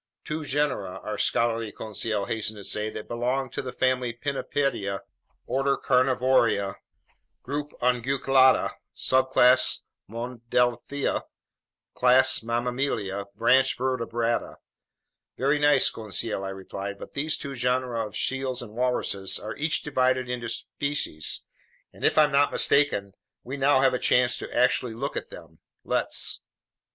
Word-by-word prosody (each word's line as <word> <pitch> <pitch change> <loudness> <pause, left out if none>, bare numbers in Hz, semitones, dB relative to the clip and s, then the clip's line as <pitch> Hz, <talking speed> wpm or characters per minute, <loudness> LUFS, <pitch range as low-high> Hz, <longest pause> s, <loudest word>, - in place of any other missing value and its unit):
"Two 155 +1 -4
genera," 140 -10 -1
our 105 - -4
scholarly 115 -2 +1
Conseil 110 -1 -2
hastened 110 0 -2
to 100 - -9
say, 105 +2 -1
"that 110 - -8
belong 125 +2 -1
to - - -3
the 130 - -6
family 130 -1 0
Pinnipedia, 120 -5 -2 0.4
order 135 +1 +1
Carnivora, 125 -6 +2 0.7
group 145 +2 -4
Unguiculata, 130 +1 +3 0.3
subclass 130 -1 +4 0.3
Monodelphia, 120 +3 -1 0.7
class 130 +1 +4
Mammalia, 115 -4 -2
branch 130 +5 +3
Vertebrata." 120 -2 -1 0.8
"Very 140 +3 +2
nice, 145 -2 +4
Conseil," 110 -1 -3
I 95 - -3
replied, 95 +1 -6
"but - - -10
these 150 +2 -1
two 140 -1 -6
genera 125 -2 -1
of 105 - -8
seals 130 -2 -1
and 105 -3 -11
walruses 120 -5 -1
are 110 - -6
each 155 +2 0
divided 130 -3 +1
into 120 -1 -4
species, 130 - -3 0.5
and - - -13
if - - +2
I'm 150 -1 +5
not 140 +1 +3
mistaken, 120 -9 +2 0.3
we 130 +3 -5
now 135 -1 +3
have 135 -1 +4
a 125 - 0
chance 125 0 +3
to - - -7
actually 125 -1 +1
look - - -4
at - - -4
them. - - -13 0.2
Let's." - - 0
125 Hz, 130 wpm, -26 LUFS, 115-135 Hz, 0.8 s, I'm